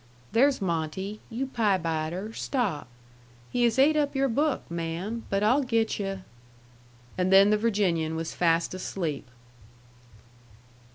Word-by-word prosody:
There's 265 Hz, +4 st, +3 dB
Monte...you 190 Hz, -, -3 dB
pie 225 Hz, -7 st, +1 dB
biter, 165 Hz, +5 st, -3 dB
stop.... 220 Hz, -, -2 dB, 0.6 s
He 245 Hz, -1 st, +2 dB
has 235 Hz, 0 st, +1 dB
ate 290 Hz, +4 st, +5 dB
up 290 Hz, -2 st, 0 dB
your 270 Hz, 0 st, +2 dB
book, 290 Hz, +4 st, 0 dB
ma'am, 170 Hz, +7 st, -4 dB
but 195 Hz, +1 st, 0 dB
I'll 250 Hz, +7 st, +4 dB
get 230 Hz, -5 st, 0 dB
yu'..." 195 Hz, -1 st, -4 dB, 1.0 s
And 180 Hz, +1 st, +1 dB
then 195 Hz, +2 st, +7 dB
the -, -, +5 dB
Virginian 190 Hz, -8 st, 0 dB
was 165 Hz, 0 st, -4 dB
fast 170 Hz, 0 st, +1 dB
asleep. 170 Hz, -7 st, -4 dB
200 Hz, 125 wpm, -27 LUFS, 170-235 Hz, 1.0 s, then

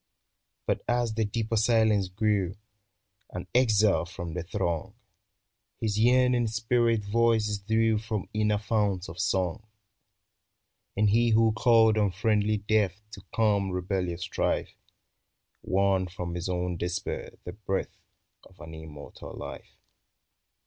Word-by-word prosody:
But -, -, 0 dB
as 120 Hz, -2 st, +1 dB
the 110 Hz, 0 st, 0 dB
deeper 110 Hz, +2 st, -2 dB
silence 110 Hz, -3 st, +3 dB
grew 100 Hz, -1 st, 0 dB, 0.4 s
— -, -, -48 dB
An -, -, -4 dB
exile 110 Hz, -7 st, +3 dB
from 85 Hz, -1 st, -7 dB
the 90 Hz, -, -3 dB
throng, 85 Hz, -2 st, -3 dB, 0.8 s
His 110 Hz, -1 st, -1 dB
yearning 125 Hz, 0 st, +4 dB
spirit 115 Hz, 0 st, +1 dB
voices 110 Hz, -1 st, +1 dB
drew 110 Hz, +2 st, +1 dB
From 110 Hz, -3 st, -4 dB
inner 105 Hz, -1 st, +1 dB
founts 105 Hz, -4 st, -1 dB
of 85 Hz, +1 st, -10 dB
song; 95 Hz, 0 st, 0 dB, 1.4 s
And 105 Hz, 0 st, +3 dB
he 115 Hz, +2 st, +3 dB
who 110 Hz, 0 st, +4 dB
called 110 Hz, -1 st, +4 dB
unfriendly 105 Hz, +1 st, +1 dB
death 105 Hz, -2 st, 0 dB
To 100 Hz, -, -10 dB
calm 105 Hz, -3 st, +2 dB
rebellious 90 Hz, -1 st, -2 dB
strife, -, -, -1 dB, 0.9 s
Won 95 Hz, -1 st, +1 dB
from 90 Hz, -1 st, -6 dB
his 90 Hz, +1 st, -4 dB
own 90 Hz, -1 st, -2 dB
despair 90 Hz, +2 st, -4 dB
the 90 Hz, -, -6 dB
breath 95 Hz, -1 st, -3 dB, 0.5 s
Of 95 Hz, -, -20 dB
an 80 Hz, -1 st, -10 dB
immortal 80 Hz, -2 st, -10 dB
life. -, -, -9 dB
105 Hz, 125 wpm, -28 LUFS, 95-110 Hz, 1.4 s, yearning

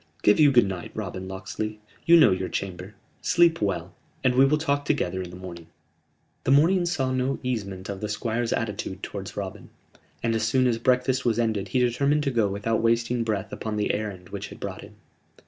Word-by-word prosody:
"Give 105 Hz, -, +5 dB
you 145 Hz, -2 st, +7 dB
good 120 Hz, -5 st, +5 dB
night, 95 Hz, -4 st, -5 dB
Robin 95 Hz, -3 st, -5 dB
Locksley 100 Hz, +3 st, -5 dB, 0.3 s
you 170 Hz, +1 st, +8 dB
know 155 Hz, -10 st, +7 dB
your 95 Hz, 0 st, -1 dB
chamber. 95 Hz, +1 st, -5 dB, 0.3 s
Sleep 170 Hz, -4 st, +3 dB
well 90 Hz, -3 st, -1 dB, 0.3 s
and 130 Hz, -1 st, +3 dB
we 130 Hz, +2 st, +6 dB
will 150 Hz, +2 st, +3 dB
talk 145 Hz, -2 st, 0 dB
together 140 Hz, -10 st, -1 dB
in 90 Hz, -, -6 dB
the 90 Hz, -, -10 dB
morning." 85 Hz, -2 st, -9 dB, 0.8 s
The -, -, -2 dB
morning 170 Hz, +6 st, +4 dB
saw 135 Hz, -7 st, 0 dB
no 130 Hz, +1 st, 0 dB
easement 100 Hz, -7 st, -3 dB
of 100 Hz, -1 st, -5 dB
the 105 Hz, -, -3 dB
Squire's 115 Hz, +2 st, -1 dB
attitude 105 Hz, -3 st, -3 dB
towards -, -, -6 dB
Robin; -, -, -6 dB, 0.5 s
and 115 Hz, -1 st, +1 dB
as 110 Hz, -, 0 dB
soon 130 Hz, +4 st, +2 dB
as 120 Hz, -2 st, +1 dB
breakfast 130 Hz, +1 st, +2 dB
was 115 Hz, -2 st, +1 dB
ended 110 Hz, -4 st, 0 dB
he 130 Hz, -, 0 dB
determined 140 Hz, +5 st, +2 dB
to 140 Hz, -, 0 dB
go 115 Hz, -4 st, +2 dB
without 105 Hz, +3 st, -1 dB
wasting 115 Hz, +1 st, +1 dB
breath 105 Hz, -3 st, -2 dB
upon 110 Hz, -1 st, -4 dB
the 105 Hz, -, +1 dB
errand 100 Hz, -4 st, -4 dB
which -, -, -5 dB
had -, -, -12 dB
brought -, -, -5 dB
him. -, -, -13 dB
115 Hz, 200 wpm, -25 LUFS, 100-130 Hz, 0.8 s, you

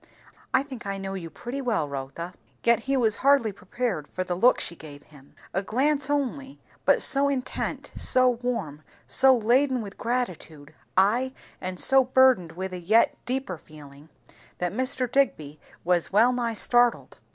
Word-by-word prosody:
I 260 Hz, -, +2 dB
think 260 Hz, -6 st, -9 dB
I 195 Hz, 0 st, -3 dB
know 195 Hz, 0 st, -5 dB
you 175 Hz, -4 st, -6 dB
pretty 240 Hz, -, -6 dB
well, 225 Hz, -, -1 dB
Rotha." 140 Hz, +6 st, -7 dB, 0.3 s
Yet 235 Hz, 0 st, +4 dB
he 270 Hz, +3 st, -1 dB
was 225 Hz, -4 st, +3 dB
hardly 275 Hz, -5 st, +3 dB
prepared 200 Hz, -4 st, -4 dB
for 185 Hz, -, -4 dB
the 180 Hz, -, -3 dB
look 235 Hz, +8 st, +3 dB
she 170 Hz, -, -4 dB
gave 145 Hz, -3 st, -12 dB
him; 140 Hz, -2 st, -20 dB, 0.2 s
a 190 Hz, -, 0 dB
glance 275 Hz, +7 st, 0 dB
only, 280 Hz, -1 st, -3 dB, 0.3 s
but -, -, +3 dB
so 280 Hz, 0 st, +4 dB
intent, 260 Hz, -2 st, -4 dB
so 255 Hz, 0 st, +4 dB
warm, 235 Hz, -, -2 dB, 0.2 s
so 260 Hz, -, +5 dB
laden 250 Hz, +2 st, +1 dB
with 200 Hz, -1 st, -11 dB
gratitude, 180 Hz, -, -4 dB, 0.2 s
ay, 235 Hz, +7 st, +2 dB, 0.3 s
and 185 Hz, 0 st, -5 dB
so 270 Hz, 0 st, +5 dB
burdened 255 Hz, -9 st, +3 dB
with 185 Hz, +1 st, -6 dB
a 180 Hz, -, -5 dB
yet 215 Hz, +7 st, +3 dB
deeper 250 Hz, -9 st, -3 dB
feeling, 150 Hz, -1 st, -15 dB, 0.5 s
that 180 Hz, 0 st, -3 dB
Mr. 255 Hz, +2 st, 0 dB
Digby 155 Hz, -, 0 dB, 0.2 s
was 175 Hz, -1 st, +1 dB
well 225 Hz, +5 st, +4 dB
nigh 235 Hz, -2 st, -2 dB
startled. 240 Hz, +2 st, +1 dB
230 Hz, 165 wpm, -25 LUFS, 175-260 Hz, 0.5 s, so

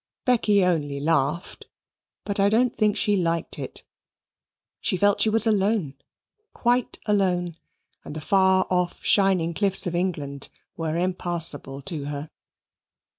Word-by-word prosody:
Becky 210 Hz, -6 st, +3 dB
only 145 Hz, -6 st, -1 dB
laughed: 150 Hz, +2 st, -1 dB, 0.6 s
but 200 Hz, -1 st, -2 dB
I 200 Hz, +1 st, +4 dB
don't 235 Hz, +3 st, +2 dB
think 210 Hz, -2 st, +1 dB
she 205 Hz, -, +2 dB
liked 170 Hz, -3 st, -1 dB
it. -, -, -7 dB, 1.0 s
She 185 Hz, -, 0 dB
felt 205 Hz, +2 st, +2 dB
she 220 Hz, -, +4 dB
was 220 Hz, +1 st, +4 dB
alone, 205 Hz, -7 st, +1 dB, 0.6 s
quite 245 Hz, 0 st, +1 dB
alone, 180 Hz, -5 st, 0 dB, 0.5 s
and -, -, -9 dB
the -, -, -4 dB
far 190 Hz, +2 st, +3 dB
off 180 Hz, -1 st, -1 dB
shining 190 Hz, -4 st, +3 dB
cliffs 195 Hz, +2 st, +2 dB
of 175 Hz, -, -2 dB
England 150 Hz, -6 st, -3 dB, 0.3 s
were 160 Hz, 0 st, -2 dB
impassable 170 Hz, -6 st, -3 dB
to 150 Hz, -1 st, -5 dB
her. 145 Hz, +1 st, -6 dB
180 Hz, 130 wpm, -24 LUFS, 160-205 Hz, 1.0 s, I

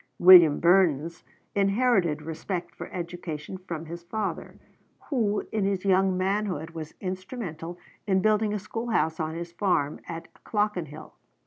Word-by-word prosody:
William 175 Hz, -5 st, +8 dB
Burness 170 Hz, -3 st, +3 dB, 0.3 s
inherited 195 Hz, -6 st, +2 dB
respect 170 Hz, +3 st, -4 dB
for -, -, -9 dB
education 175 Hz, -1 st, -6 dB
from 170 Hz, -3 st, -6 dB
his 170 Hz, +2 st, -7 dB
father, 200 Hz, +4 st, -4 dB, 0.5 s
who 215 Hz, -6 st, 0 dB
in 215 Hz, -2 st, 0 dB
his 195 Hz, -1 st, -1 dB
young 190 Hz, -1 st, +3 dB
manhood 185 Hz, -4 st, -1 dB
was 160 Hz, -2 st, -8 dB
instrumental 185 Hz, -3 st, -5 dB, 0.3 s
in 190 Hz, -1 st, +3 dB
building 215 Hz, +1 st, +2 dB
a 210 Hz, -, -1 dB
schoolhouse 210 Hz, -5 st, -1 dB
on 160 Hz, 0 st, -2 dB
his 170 Hz, 0 st, -6 dB
farm 170 Hz, -6 st, 0 dB
at 165 Hz, -1 st, -6 dB, 0.2 s
Clockenhill. 180 Hz, -8 st, -2 dB
185 Hz, 130 wpm, -27 LUFS, 165-200 Hz, 0.5 s, William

